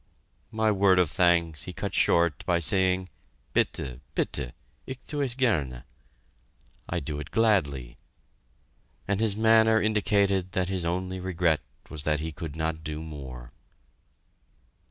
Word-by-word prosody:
My 110 Hz, 0 st, +1 dB
word 95 Hz, -2 st, +4 dB
of 90 Hz, -5 st, +3 dB
thanks 85 Hz, -2 st, +2 dB
he -, -, -6 dB
cut -, -, -4 dB
short 85 Hz, -4 st, +2 dB
by 90 Hz, -, +3 dB
saying, 95 Hz, +2 st, +1 dB, 0.4 s
"Bitte! 65 Hz, -3 st, -1 dB, 0.2 s
bitte! 65 Hz, -4 st, -2 dB, 0.3 s
Ich 130 Hz, -, -5 dB
thue 145 Hz, -1 st, -3 dB
es 130 Hz, -4 st, -1 dB
gerne" 75 Hz, -, 0 dB, 1.1 s
(I -, -, 0 dB
do 75 Hz, +1 st, -4 dB
it 75 Hz, -, -7 dB
gladly); 70 Hz, -, +1 dB, 1.1 s
and 100 Hz, 0 st, 0 dB
his 110 Hz, -3 st, +2 dB
manner 110 Hz, 0 st, +5 dB
indicated 100 Hz, -3 st, +1 dB
that 90 Hz, -1 st, 0 dB
his 95 Hz, -3 st, -2 dB
only 90 Hz, +2 st, -2 dB
regret 85 Hz, -4 st, +1 dB, 0.3 s
was 75 Hz, -, -7 dB
that 75 Hz, 0 st, 0 dB
he 80 Hz, +1 st, -4 dB
could 80 Hz, -2 st, -7 dB
not 80 Hz, 0 st, -2 dB
do 75 Hz, +1 st, -5 dB
more. 65 Hz, -6 st, -9 dB
90 Hz, 135 wpm, -27 LUFS, 75-100 Hz, 1.1 s, manner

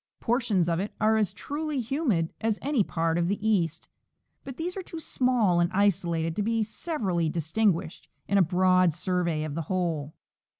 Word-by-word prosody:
Portions 230 Hz, -7 st, +1 dB
of 170 Hz, 0 st, +1 dB
it 200 Hz, +3 st, -4 dB
are 220 Hz, 0 st, +3 dB
as 215 Hz, -4 st, +1 dB
truly 300 Hz, -1 st, -4 dB
humid 235 Hz, -, 0 dB
as 220 Hz, -1 st, 0 dB
any 275 Hz, -6 st, +2 dB
part 165 Hz, -1 st, -1 dB
of 170 Hz, -, +1 dB
the 205 Hz, +3 st, -1 dB
east, 170 Hz, -6 st, 0 dB, 0.6 s
but 270 Hz, -2 st, -8 dB
these 350 Hz, +2 st, -3 dB
are 385 Hz, -, -3 dB
too 335 Hz, -2 st, -8 dB
small 245 Hz, -, +2 dB
and 175 Hz, 0 st, +2 dB
isolated 170 Hz, -5 st, +1 dB
to -, -, +1 dB
be 225 Hz, +1 st, +1 dB
severally 205 Hz, -, -2 dB
distinguished 165 Hz, +2 st, -1 dB, 0.2 s
in 200 Hz, 0 st, +3 dB
a -, -, +6 dB
broad 185 Hz, -1 st, +3 dB
survey 175 Hz, -3 st, -1 dB
of 155 Hz, -2 st, -4 dB
the 165 Hz, -, -2 dB
whole. 165 Hz, -5 st, -2 dB
190 Hz, 175 wpm, -27 LUFS, 170-225 Hz, 0.6 s, a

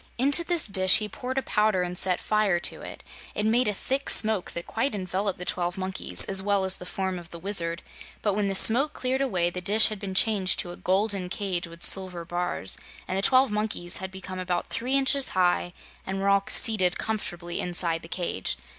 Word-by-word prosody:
Into 280 Hz, +7 st, +5 dB
this 345 Hz, -1 st, +1 dB
dish 190 Hz, -2 st, +5 dB
he 215 Hz, -, -3 dB
poured 255 Hz, +5 st, -7 dB
a 270 Hz, -, -1 dB
powder 210 Hz, -3 st, 0 dB
and 180 Hz, 0 st, -5 dB
set 180 Hz, 0 st, +3 dB
fire 215 Hz, -5 st, 0 dB
to -, -, -1 dB
it. -, -, -11 dB, 0.3 s
It 210 Hz, -, -2 dB
made 235 Hz, +2 st, +1 dB
a -, -, +2 dB
thick 270 Hz, +7 st, -4 dB
smoke 215 Hz, -4 st, +2 dB
that 170 Hz, -, -6 dB
quite 230 Hz, +1 st, -2 dB
enveloped 190 Hz, +1 st, -3 dB
the 180 Hz, -, -8 dB
twelve 175 Hz, +1 st, -3 dB
monkeys, 190 Hz, 0 st, +5 dB
as 195 Hz, 0 st, +4 dB
well 200 Hz, 0 st, 0 dB
as 190 Hz, 0 st, +3 dB
the 180 Hz, -, -10 dB
form 190 Hz, -1 st, -4 dB
of 170 Hz, -1 st, -13 dB
the 170 Hz, -, -9 dB
Wizard, 170 Hz, -2 st, 0 dB, 0.4 s
but 205 Hz, -, 0 dB
when 205 Hz, 0 st, -1 dB
the 195 Hz, -, -2 dB
smoke 265 Hz, +10 st, +4 dB
cleared 260 Hz, +1 st, -3 dB
away 180 Hz, -10 st, -1 dB
the 180 Hz, -, -6 dB
dish 210 Hz, +5 st, +5 dB
had 215 Hz, -2 st, -7 dB
been 190 Hz, -2 st, -7 dB
changed 195 Hz, -2 st, +2 dB
to 175 Hz, -, -8 dB
a -, -, -8 dB
golden 195 Hz, 0 st, -1 dB
cage 185 Hz, -2 st, -3 dB
with 170 Hz, 0 st, -8 dB
silver 185 Hz, -3 st, 0 dB
bars, 175 Hz, -, -2 dB, 0.3 s
and 185 Hz, -, -4 dB
the 195 Hz, -, -1 dB
twelve 260 Hz, +3 st, +3 dB
monkeys 210 Hz, -4 st, -1 dB
had 190 Hz, -, -6 dB
become 185 Hz, 0 st, -9 dB
about 180 Hz, -1 st, -4 dB
three 255 Hz, +3 st, -2 dB
inches 275 Hz, 0 st, +2 dB
high 175 Hz, -1 st, +1 dB, 0.3 s
and 190 Hz, 0 st, -5 dB
were 195 Hz, +1 st, -1 dB
all 200 Hz, 0 st, +2 dB
seated 190 Hz, -5 st, +3 dB
comfortably 175 Hz, -6 st, -5 dB
inside 170 Hz, -2 st, +1 dB
the -, -, -11 dB
cage. 170 Hz, -, -4 dB
190 Hz, 215 wpm, -25 LUFS, 180-215 Hz, 0.4 s, Into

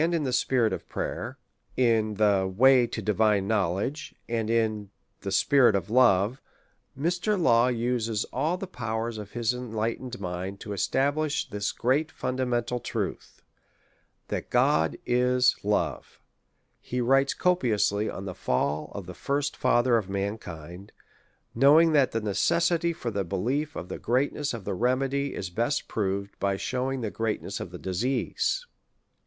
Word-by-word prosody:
in 165 Hz, -1 st, +1 dB
the 130 Hz, -3 st, -1 dB
Spirit 120 Hz, -3 st, +2 dB
of -, -, -6 dB
Prayer, -, -, -4 dB, 0.4 s
in 115 Hz, -4 st, +2 dB
the 100 Hz, -2 st, +2 dB
Way 125 Hz, +4 st, +5 dB
to 110 Hz, -1 st, -5 dB
Divine 105 Hz, -1 st, +2 dB
Knowledge, 110 Hz, -, -1 dB
and 115 Hz, -2 st, -2 dB
in 110 Hz, -3 st, 0 dB, 0.3 s
the 100 Hz, -, -5 dB
Spirit 120 Hz, +2 st, +4 dB
of 100 Hz, +1 st, -2 dB
Love, 120 Hz, 0 st, +4 dB, 0.6 s
Mr. 180 Hz, +6 st, 0 dB
Law 120 Hz, -7 st, +4 dB
uses 115 Hz, -3 st, -1 dB
all 155 Hz, +7 st, 0 dB
the 195 Hz, -, -5 dB
powers 115 Hz, -, -4 dB
of 105 Hz, -1 st, -9 dB
his 120 Hz, 0 st, 0 dB
enlightened 120 Hz, 0 st, -4 dB
mind 95 Hz, +1 st, -5 dB
to 105 Hz, -, -5 dB
establish 145 Hz, +9 st, 0 dB
this 105 Hz, -4 st, -2 dB
great 145 Hz, +6 st, 0 dB
fundamental 125 Hz, -1 st, -1 dB
truth -, -, -5 dB, 0.4 s
— -, -, -41 dB
that -, -, -4 dB
God 80 Hz, +1 st, +2 dB
is 125 Hz, 0 st, +3 dB
love. 105 Hz, +1 st, -1 dB, 0.6 s
He 125 Hz, -, -4 dB
writes 135 Hz, +3 st, +3 dB
copiously 110 Hz, -, +1 dB
on 95 Hz, -, -6 dB
the 95 Hz, -, -5 dB
fail 70 Hz, +1 st, -1 dB
of 100 Hz, -3 st, -6 dB
the 90 Hz, -, -8 dB
first 140 Hz, +7 st, -2 dB
fa 120 Hz, -, +3 dB
ther 120 Hz, -2 st, +3 dB
of 100 Hz, -3 st, -7 dB
mankind, 95 Hz, -3 st, -5 dB, 0.6 s
knowing 150 Hz, +7 st, +6 dB
that 140 Hz, -4 st, +4 dB
the 115 Hz, -, -1 dB
necessity 170 Hz, -, +1 dB
for 140 Hz, -8 st, -4 dB
the 100 Hz, -2 st, -1 dB
belief 125 Hz, -, -2 dB
of 90 Hz, -, -6 dB
the -, -, -6 dB
greatness 140 Hz, +4 st, 0 dB
of 115 Hz, -5 st, -6 dB
the 100 Hz, -, -2 dB
remedy 135 Hz, +6 st, 0 dB
is 90 Hz, -, -5 dB
best 120 Hz, +10 st, -1 dB
proved 100 Hz, -1 st, -3 dB
by 100 Hz, -1 st, 0 dB
shewing 130 Hz, +4 st, -2 dB
the 110 Hz, -3 st, -3 dB
greatness 110 Hz, -1 st, -3 dB
of -, -, -6 dB
the -, -, -8 dB
disease. 125 Hz, -, -1 dB
Mr. -, -, -43 dB
115 Hz, 155 wpm, -27 LUFS, 100-135 Hz, 0.6 s, knowing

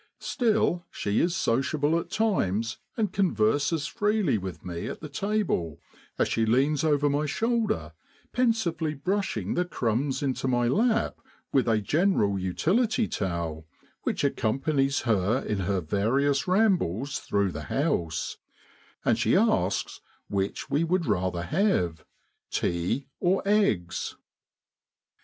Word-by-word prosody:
Still, 220 Hz, -7 st, +1 dB
she 100 Hz, 0 st, -1 dB
is 170 Hz, +1 st, +1 dB
sociable 145 Hz, +2 st, +1 dB
at -, -, -7 dB
times 115 Hz, -, 0 dB, 0.2 s
and 215 Hz, -3 st, 0 dB
converses 145 Hz, -, +1 dB
freely 210 Hz, -, +1 dB
with 90 Hz, -4 st, -7 dB
me 85 Hz, -2 st, -4 dB
at -, -, -5 dB
the 155 Hz, -, -7 dB
table, 170 Hz, -, -1 dB, 0.4 s
as -, -, +2 dB
she 115 Hz, -, 0 dB
leans 135 Hz, +7 st, +2 dB
over 145 Hz, -2 st, +3 dB
my 145 Hz, +1 st, +1 dB
shoulder, 225 Hz, -, 0 dB, 0.4 s
pensively 175 Hz, -11 st, +1 dB
brushing 150 Hz, -, -1 dB
the 180 Hz, -, +1 dB
crumbs 130 Hz, -4 st, -1 dB
into 135 Hz, -1 st, -1 dB
my 120 Hz, -2 st, +2 dB
lap 225 Hz, -, +1 dB, 0.3 s
with 130 Hz, -3 st, +3 dB
a 110 Hz, -2 st, +3 dB
general 105 Hz, -, +2 dB
utility 215 Hz, -, +1 dB
towel 85 Hz, -4 st, -3 dB, 0.3 s
which -, -, -2 dB
accompanies 135 Hz, +4 st, +1 dB
her 110 Hz, -1 st, +2 dB
in 105 Hz, -, -1 dB
her 95 Hz, 0 st, 0 dB
various 135 Hz, -, +1 dB
rambles 175 Hz, -, +1 dB
through 100 Hz, -2 st, 0 dB
the 75 Hz, -2 st, -6 dB
house, 135 Hz, -, -1 dB, 0.7 s
and -, -, +3 dB
she -, -, +3 dB
asks -, -, +1 dB, 0.3 s
which 100 Hz, 0 st, -2 dB
we 145 Hz, +4 st, +1 dB
would 170 Hz, +1 st, +1 dB
rather 90 Hz, -5 st, 0 dB
have 90 Hz, -, +1 dB, 0.5 s
"tea 85 Hz, +11 st, -1 dB
or 185 Hz, +2 st, +2 dB
eggs?" 195 Hz, -, +1 dB
140 Hz, 125 wpm, -27 LUFS, -, 0.7 s, over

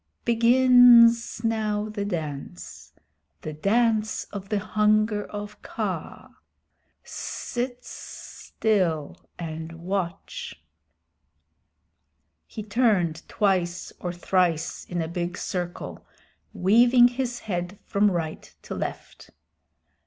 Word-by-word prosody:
Begins 235 Hz, -1 st, +6 dB
now 215 Hz, -2 st, 0 dB
the 210 Hz, -1 st, -4 dB
dance 150 Hz, -, -6 dB, 0.5 s
the 155 Hz, -, -5 dB
Dance 215 Hz, +6 st, +1 dB
of 195 Hz, -1 st, -7 dB
the 210 Hz, -, +1 dB
Hunger 210 Hz, 0 st, +1 dB
of 205 Hz, 0 st, -8 dB
Kaa. -, -, -5 dB, 0.7 s
Sit 245 Hz, 0 st, -5 dB
still 180 Hz, -9 st, -3 dB
and 160 Hz, -1 st, -6 dB
watch." 180 Hz, +2 st, -5 dB, 1.9 s
He 215 Hz, -, -7 dB
turned 205 Hz, -7 st, +1 dB
twice 185 Hz, -3 st, 0 dB
or 175 Hz, -, -3 dB
thrice 175 Hz, -2 st, 0 dB
in 175 Hz, -2 st, -3 dB
a -, -, -4 dB
big 175 Hz, +1 st, -4 dB
circle, 175 Hz, -1 st, -5 dB, 0.4 s
weaving 240 Hz, +6 st, +5 dB
his 245 Hz, -1 st, -3 dB
head 175 Hz, -1 st, -4 dB
from 205 Hz, +1 st, +2 dB
right 165 Hz, -4 st, -4 dB
to -, -, -6 dB
left. -, -, -6 dB
205 Hz, 95 wpm, -25 LUFS, 175-230 Hz, 1.9 s, Begins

